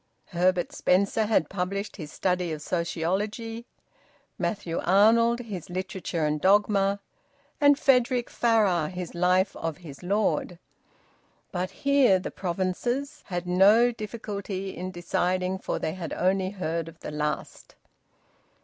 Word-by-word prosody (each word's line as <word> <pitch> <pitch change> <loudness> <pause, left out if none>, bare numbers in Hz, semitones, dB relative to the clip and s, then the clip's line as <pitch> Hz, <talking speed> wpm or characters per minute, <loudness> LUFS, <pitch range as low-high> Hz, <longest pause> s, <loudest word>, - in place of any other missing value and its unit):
Herbert 180 0 +1
Spencer 200 +4 +2
had 210 -8 +2
published 195 +3 -3
his 155 -5 -7
"Study 180 -2 -1
of 150 -1 -5
Sociology"; 205 +8 -2 0.7
Matthew 190 -6 -2
Arnold 230 +5 +4
his 200 -9 -7
"Literature 185 -3 -3
and 150 0 -1
Dogma"; 200 0 +3 0.6
and 285 -1 +6
Frederic 250 -3 +3
Farrar 205 -9 +2
his 180 -2 -6
Life 180 +2 +2
of 165 -1 -4
his 155 -7 -11
Lord; 190 -1 0 0.9
but 180 0 -2
here 280 -8 +3
the 185 - -5
provinces 220 - -2
had 175 -1 -3
no 205 +7 +5
difficulty 205 -4 -5
in 185 +1 -5
deciding, 185 +1 -1
for - - -3
they 155 - -2
had 170 -3 -5
only 185 +1 +1
heard 170 -4 -3
of 165 0 -13
the - - -6
last. 150 0 -4
190 Hz, 125 wpm, -27 LUFS, 175-215 Hz, 0.9 s, and